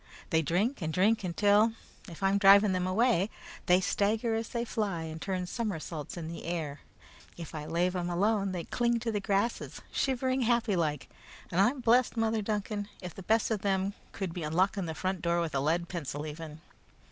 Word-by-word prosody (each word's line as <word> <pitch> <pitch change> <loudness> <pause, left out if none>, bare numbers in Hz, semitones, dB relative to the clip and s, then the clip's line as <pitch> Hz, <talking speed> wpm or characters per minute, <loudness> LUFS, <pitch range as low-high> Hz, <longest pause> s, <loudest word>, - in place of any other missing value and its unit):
They 160 - +4
drink 195 - 0
and 160 -1 -1
drink 205 +6 +2
until, 205 +5 +3 0.4
if 170 +3 -9
I'm 195 +1 +3
driving 200 +1 +7
them 185 0 0
away, 210 0 +2 0.4
they 180 +1 +6
stagger 215 +4 +1
as 225 0 -2
they 235 -1 -2
fly 200 -8 -2
and 160 0 -7
turn 185 -2 -2
somersaults 175 - -4
in 165 -2 -5
the 165 +1 -7
air. 160 -4 -3 0.6
If 170 -2 -8
I 150 -2 -5
lave 175 +3 +1
them 175 -1 -2
alone, 200 +2 +1
they 175 -2 -3
cling 235 +4 +1
to 230 -1 -1
the 210 - -1
grasses, 200 +3 -1
shivering 260 0 0
happy 235 -3 +2
like; 150 -5 -1 0.4
and 180 +2 +3
I'm 250 +6 +2
blest, 240 +1 +3
Mother 225 -1 +1
Duncan, 205 0 -2
if 180 -3 -7
the - - -9
best 220 +4 +1
of 215 -3 0
them 195 0 0 0.2
could 190 -4 -4
be 175 - -5
unlocking 180 +4 +1
the 160 - -4
front 185 0 -2
door 170 0 +1
with 165 -2 -2
a 135 - +1
lead 165 +5 +1
pencil, 150 -4 -4
even." 155 0 -8
190 Hz, 195 wpm, -30 LUFS, 170-220 Hz, 0.6 s, driving